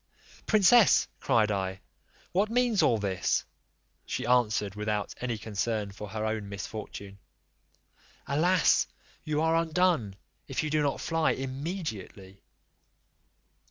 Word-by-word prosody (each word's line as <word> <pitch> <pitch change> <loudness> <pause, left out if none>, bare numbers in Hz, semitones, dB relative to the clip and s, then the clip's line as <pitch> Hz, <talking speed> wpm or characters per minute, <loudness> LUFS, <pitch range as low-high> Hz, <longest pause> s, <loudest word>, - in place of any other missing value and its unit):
"Princess," 215 +1 +5
cried 110 -2 +2
I, 95 -1 -2 0.5
"what 200 +4 +1
means 240 -2 +2
all 115 - +3
this?" 100 -3 0 0.6
She - - -4
answered, 110 -5 +2
without 105 0 -2
any 120 -2 -2
concern 105 0 -2
for 105 +1 -8
her 110 +1 -3
own 110 -2 -3
misfortune, 100 -1 -7 1.1
"Alas! 170 +6 +3 0.4
you 155 0 -1
are 160 0 +2
undone, 165 - +1 0.3
if - - -2
you 155 - -2
do 155 0 +2
not 145 -2 -1
fly 165 -1 +1
immediately." 130 - -6
120 Hz, 115 wpm, -28 LUFS, 105-165 Hz, 1.1 s, Princess